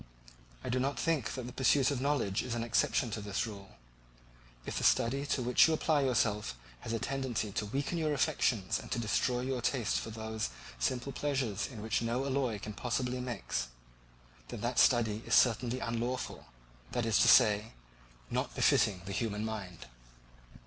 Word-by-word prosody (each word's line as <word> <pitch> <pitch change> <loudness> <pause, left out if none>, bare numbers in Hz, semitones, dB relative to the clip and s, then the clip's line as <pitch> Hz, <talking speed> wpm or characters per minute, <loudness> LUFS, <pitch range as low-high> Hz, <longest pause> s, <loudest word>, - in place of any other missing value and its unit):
I - - -4
do 130 - +1
not 140 +2 -1
think 150 -8 0
that 130 -2 -5
the 125 - -8
pursuit 130 +1 +3
of 135 -3 -2
knowledge 130 -9 0
is 125 -2 -4
an 115 - -2
exception 115 +1 +1
to 105 - -4
this 100 +2 -2
rule. 100 -3 -10 0.9
If - - -3
the - - -4
study 135 +5 +2
to 130 - 0
which 125 +5 +5
you 160 - +2
apply 155 -2 +2
yourself 110 - +1 0.2
has 110 - -6
a 115 - 0
tendency 130 -3 -2
to 105 +2 -2
weaken 140 +9 -2
your 155 -1 0
affections 120 -7 +1
and - - -10
to - - 0
destroy 120 +2 0
your 130 -1 -2
taste 120 -5 0
for - - -6
those 110 0 -4 0.3
simple 130 +2 -1
pleasures 135 -9 -1
in 110 -6 -9
which 110 +1 0
no 120 +3 -1
alloy 130 -5 0
can 105 +1 -7
possibly 125 +3 -2
mix, 105 - -3 0.8
then - - -7
that - - 0
study 110 -2 +4
is - - +3
certainly 120 +1 +3
unlawful, 120 +2 -3 0.5
that 120 - 0
is 115 -2 +3
to - - +5
say, 110 -2 +5 0.6
not - - -2
befitting 90 -4 +3
the 100 - -5
human 105 0 -2
mind. 100 - -6
120 Hz, 175 wpm, -32 LUFS, 110-130 Hz, 0.9 s, which